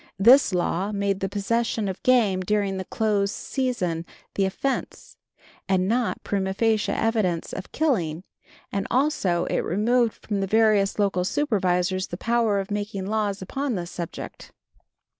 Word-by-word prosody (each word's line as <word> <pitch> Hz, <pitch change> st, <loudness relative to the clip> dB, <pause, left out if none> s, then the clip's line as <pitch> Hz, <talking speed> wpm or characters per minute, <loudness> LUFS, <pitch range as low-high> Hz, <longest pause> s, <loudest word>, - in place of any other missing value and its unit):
This 240 Hz, +6 st, +6 dB
law 180 Hz, +2 st, 0 dB
made 200 Hz, -1 st, -1 dB
the 195 Hz, -, -2 dB
possession 220 Hz, +2 st, -1 dB
of 190 Hz, -, -5 dB
game 230 Hz, -7 st, +3 dB
during 200 Hz, 0 st, 0 dB
the 190 Hz, -, -4 dB
close 205 Hz, -2 st, 0 dB
season 205 Hz, -, -2 dB, 0.3 s
the 195 Hz, -, +1 dB
offense, 260 Hz, +8 st, -3 dB, 0.5 s
and 185 Hz, -1 st, +2 dB
not 235 Hz, +2 st, 0 dB
prima 190 Hz, -1 st, -1 dB
facie 220 Hz, 0 st, +1 dB
evidence 215 Hz, -7 st, 0 dB
of 190 Hz, -, -7 dB
killing, 185 Hz, -, 0 dB, 0.5 s
and 195 Hz, 0 st, -2 dB
also 245 Hz, -, +1 dB
it -, -, 0 dB
removed 230 Hz, +5 st, +1 dB
from 205 Hz, -2 st, -1 dB
the 195 Hz, -, -1 dB
various 215 Hz, -2 st, +3 dB
local 195 Hz, -3 st, +1 dB
supervisors 185 Hz, -6 st, 0 dB
the 175 Hz, -, -6 dB
power 230 Hz, -2 st, +1 dB
of 195 Hz, +1 st, -5 dB
making 205 Hz, -2 st, -3 dB
laws 205 Hz, -2 st, -1 dB
upon 270 Hz, +5 st, -2 dB
this 175 Hz, -2 st, -4 dB
subject. 170 Hz, -2 st, -7 dB
200 Hz, 145 wpm, -25 LUFS, 190-225 Hz, 0.5 s, This